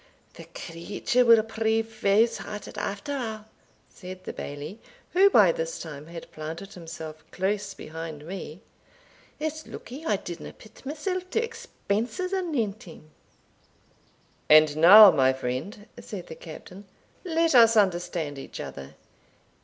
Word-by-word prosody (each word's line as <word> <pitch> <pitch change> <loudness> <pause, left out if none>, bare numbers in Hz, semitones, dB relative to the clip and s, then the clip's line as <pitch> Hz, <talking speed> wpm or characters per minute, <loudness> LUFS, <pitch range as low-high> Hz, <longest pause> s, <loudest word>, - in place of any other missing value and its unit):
"The - - -11
creature 195 +8 -1
will 230 -2 +6
prove 225 0 0
fause 220 +1 +2
hearted, 210 0 -8
after 205 +7 -4
a'," 220 -6 -4 0.4
said 185 0 -10
the - - -6
Bailie, 145 +9 -7 0.3
who 390 +2 +6
by 205 - +6
this 165 0 -4
time 150 -2 -8
had 165 0 -10
planted 160 +6 -7
himself 160 -2 -9
close 200 +1 -2
behind 160 -2 -8
me; 180 -1 -7 0.8
"it's 315 +1 -4
lucky 270 +6 -9
I 265 - +1
didna 175 -3 -7
pit 220 - -17
mysell 320 +6 -3
to 450 - 0
expenses 365 - -3
anent 260 - -1
him." 160 -6 -14 1.4
"And 155 -1 +7
now, 195 +6 +10
my 130 -1 +3
friend," 130 - -5
said 190 -5 -8
the 160 - -9
Captain, 180 +5 -11 0.4
"let 330 -3 +1
us 230 -2 +7
understand 175 -7 0
each - - -9
other. 70 +2 -8
200 Hz, 130 wpm, -26 LUFS, 160-230 Hz, 1.4 s, now